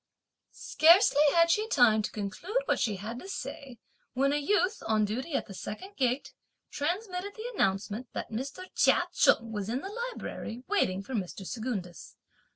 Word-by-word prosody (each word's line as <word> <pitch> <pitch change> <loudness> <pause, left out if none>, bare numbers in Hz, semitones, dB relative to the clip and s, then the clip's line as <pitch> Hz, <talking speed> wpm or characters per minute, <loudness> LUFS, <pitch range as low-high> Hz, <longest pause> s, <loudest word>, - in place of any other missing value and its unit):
Scarcely 325 -2 +5
had 335 0 +5
she 430 +5 +1
time 240 - +4
to 210 - -3
conclude 335 - -3
what - - +1
she 215 -4 0
had 220 +5 -6
to 380 - -10
say 270 -9 -6 0.4
when 275 +2 +2
a - - +2
youth, 365 +6 +1
on 215 -1 +3
duty 255 +9 -3
at - - 0
the 200 - -10
second 375 - -7
gate, 255 +1 -1 0.4
transmitted 365 +5 -3
the 460 +3 -6
announcement 205 - -1
that - - -5
Mr. 270 +10 -5
Chia - - +4
Cheng 230 0 +3
was 205 -1 -4
in 250 +4 -1
the 385 - -6 0.2
Library 245 - -7
waiting 195 - +1
for 260 - -8
Mr. 195 -3 -4
Secundus. 205 - -5
255 Hz, 165 wpm, -29 LUFS, 215-360 Hz, 0.4 s, Scarcely